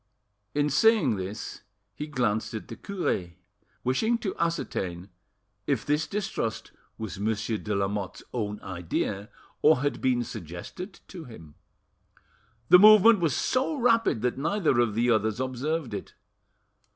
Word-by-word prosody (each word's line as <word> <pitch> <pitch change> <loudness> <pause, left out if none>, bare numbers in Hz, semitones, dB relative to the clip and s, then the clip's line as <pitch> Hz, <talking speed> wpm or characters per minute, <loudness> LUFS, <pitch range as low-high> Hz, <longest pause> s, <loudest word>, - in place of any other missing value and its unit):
In 145 0 +2
saying 155 - +4
this 95 +3 -6 0.3
he 150 - -6
glanced 120 -7 -1
at 110 - -7
the 115 - -6
cure; 115 - -3 0.5
wishing 220 - +1
to 210 -4 -4
ascertain 100 - -2 0.6
if 130 -7 0
this 150 +1 +1
distrust 195 - -3 0.3
was 110 -3 -6
Monsieur 110 +1 -1
de 105 0 -3
Lamotte's 100 -2 -2
own 105 -3 -3
idea, 95 +2 -3 0.3
or 150 -4 +5
had 145 0 -1
been 125 -2 +2
suggested 110 - -8
to 175 -4 -9
him. 80 - -12 1.2
The 180 - +9
movement 215 +1 +8
was 160 -7 +1
so 265 +5 0
rapid 230 - +2
that 125 +1 0
neither 160 - +1
of 115 -4 +2
the 120 +2 +2
others 110 0 +1
observed 130 +1 -2
it. 100 - -6
125 Hz, 135 wpm, -27 LUFS, 105-170 Hz, 1.2 s, The